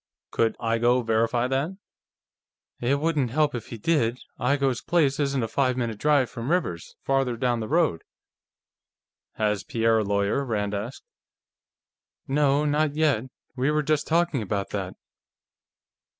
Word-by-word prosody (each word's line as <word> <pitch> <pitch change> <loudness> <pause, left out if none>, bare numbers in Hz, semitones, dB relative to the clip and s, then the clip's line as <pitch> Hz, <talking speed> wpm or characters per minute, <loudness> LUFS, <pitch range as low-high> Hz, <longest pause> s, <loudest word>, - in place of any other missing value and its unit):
"Could 115 -1 +1
Igoe 120 +2 +2
verify 115 +2 +1
that?" 140 +8 -1 1.0
"It 135 +4 +1
wouldn't 150 -5 +1
help 150 +4 +1
if 120 -3 -5
he 115 - -7
did. 120 -2 +1 0.2
Igoe's 135 -1 +1
place 150 -6 +1
isn't 140 -3 0
a - - -1
five 130 +2 0
minute 115 -4 -2
drive 145 -4 +3
from 115 +3 -6
Rivers's, 155 - -1
farther 135 -3 +1
down 120 -1 0
the 110 - -4
road." 155 - +2 1.3
"Has 105 -3 0
Pierre 115 -1 +2
a - - +1
lawyer?" 100 +6 0
Rand 105 -5 -2
asked. 105 +5 -5 1.2
"No. 145 +1 +2
Not 150 0 +1
yet. 150 -7 +2 0.3
We 130 +2 +1
were 150 0 +1
just 155 0 0
talking 165 -5 +1
about 100 -1 -3
that." 95 -2 -4
125 Hz, 140 wpm, -25 LUFS, 115-145 Hz, 1.3 s, drive